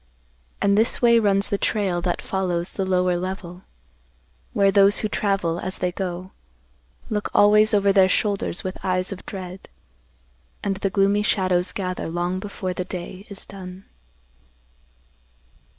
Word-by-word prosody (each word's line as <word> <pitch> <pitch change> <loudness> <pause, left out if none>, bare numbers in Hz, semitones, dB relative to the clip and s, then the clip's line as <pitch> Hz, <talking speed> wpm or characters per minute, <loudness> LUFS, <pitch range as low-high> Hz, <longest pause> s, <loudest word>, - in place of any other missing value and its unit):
And 200 +1 +4
this 225 - +2
way 235 -1 +5
runs 200 -2 +2
the 200 - -1
trail 190 -5 0
that 175 0 -2
follows 180 -2 -1
the 190 -1 -3
lower 180 -1 +2
level, 185 -1 -6 0.9
where 200 -1 +3
those 200 +1 +5
who 215 - 0
travel, 195 -5 0
as 185 +1 -4
they 180 - -1
go, 185 0 -5 0.8
look 210 -1 -1
always 210 +1 +6
over 200 -2 +3
their 190 -1 +5
shoulders 200 -3 0
with 185 0 -6
eyes 185 0 0
of 195 - -7
dread, 185 -1 -8 0.9
and 195 -1 -1
the 195 0 -1
gloomy 200 +1 +2
shadows 185 -3 +1
gather 185 -2 -3
long 175 +2 -2
before 190 -2 -4
the 180 - -3
day 185 +2 -7
is 200 - -8
done. 185 -1 -10
190 Hz, 145 wpm, -23 LUFS, 180-200 Hz, 0.9 s, always